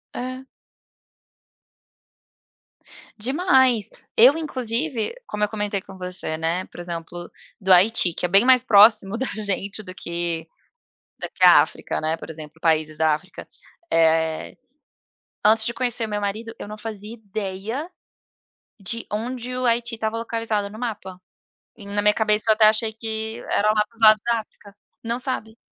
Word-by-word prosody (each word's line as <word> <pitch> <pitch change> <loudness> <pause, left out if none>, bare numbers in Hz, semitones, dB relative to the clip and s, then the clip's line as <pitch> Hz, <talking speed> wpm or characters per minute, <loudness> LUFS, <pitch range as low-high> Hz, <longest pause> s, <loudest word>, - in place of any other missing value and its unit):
É. 255 +1 -5 2.7
Demais. 260 - +2 0.3
Eu 260 +7 +7
inclusive, 255 - -2
como 210 0 -3
eu 210 - +1
comentei 205 -2 -3
com 190 - -13
você, 180 -3 -3
né, 165 +3 -1
por - - -14
exemplo, 175 0 -7 0.3
do 190 -1 +1
Haiti, 185 -1 +4
é - - +3
bem 195 +4 +5
mais 255 -1 +5
próximo 210 -1 +5
da 265 - -2 0.2
gente 200 +2 -3
do 185 - -9
que 170 -2 -3 0.7
do - - -5
que - - +1
a - - +9
África, - - -5
né, 155 +1 0
por - - -10
exemplo 160 0 -10
países 155 -2 +1
da 160 -1 +3
África. 185 +5 -10 0.4
Eh, 160 -1 +1 0.9
antes 220 +1 +4
de 235 - -1
conhecer 240 -2 -2
meu 210 -1 -3
marido 215 +3 -4
eu - - -7
não 215 +1 -8
fazia 215 -1 -7
ideia, 215 - -5 0.9
de 230 +5 -5
onde 245 +3 -4
o 255 - -2
Haiti 235 0 0
estava 220 0 -2
localizado 225 -3 -2
no 215 - -11
mapa. 190 -6 -6 0.6
E 205 - -13
na 205 +1 -2
minha 210 0 +4
cabeça 215 0 +1
eu - - +7
até 215 0 +4
achei 220 +1 +1
que 220 0 -5
era 210 - +1
lá 215 0 +3
para 230 - -32
os 230 - -13
lados 215 -2 +6
da 235 -1 +1
África, 205 -2 -14 0.3
não 235 +1 -2
sabe. 230 -3 -4
215 Hz, 155 wpm, -23 LUFS, 185-230 Hz, 2.7 s, a